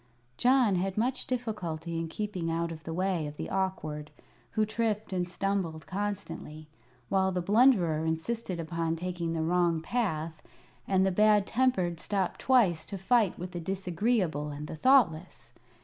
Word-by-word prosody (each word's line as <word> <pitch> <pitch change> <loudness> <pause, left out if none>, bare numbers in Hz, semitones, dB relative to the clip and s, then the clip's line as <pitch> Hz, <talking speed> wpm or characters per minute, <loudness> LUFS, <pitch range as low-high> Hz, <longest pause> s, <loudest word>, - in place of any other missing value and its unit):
John 245 - +4
had 190 +2 -2
much 250 +4 0
difficulty 175 -10 -3
in 165 - -2
keeping 185 -1 -3
out 165 +1 -1
of 160 -1 -9
the 165 - -4
way 180 -2 0
of 145 0 -9
the - - -5
Awkward, 155 -6 -2 0.4
who 215 - +2
tripped 215 -2 -2
and 180 -1 -1
stumbled 180 -5 -2
constantly, 195 -6 -5 0.4
while 190 -1 +2
the 180 - -1
Blunderer 190 -5 +4
insisted 175 +4 -2
upon 165 0 -2
taking 175 -1 -3
the 160 -1 -1
wrong 170 0 +2
path, 160 -6 -2 0.5
and 190 -1 +3
the 190 - +2
Bad 210 +1 +4
Tempered 190 -10 +1
stopped 195 0 -1
twice 210 -11 +3
to 200 - -6
fight 210 +1 +2
with 180 +1 -6
the 175 - -5
Disagreeable 185 - -1
and 145 +1 -6
the 155 - -6
Thoughtless. 180 - +2
180 Hz, 155 wpm, -29 LUFS, 165-210 Hz, 0.5 s, John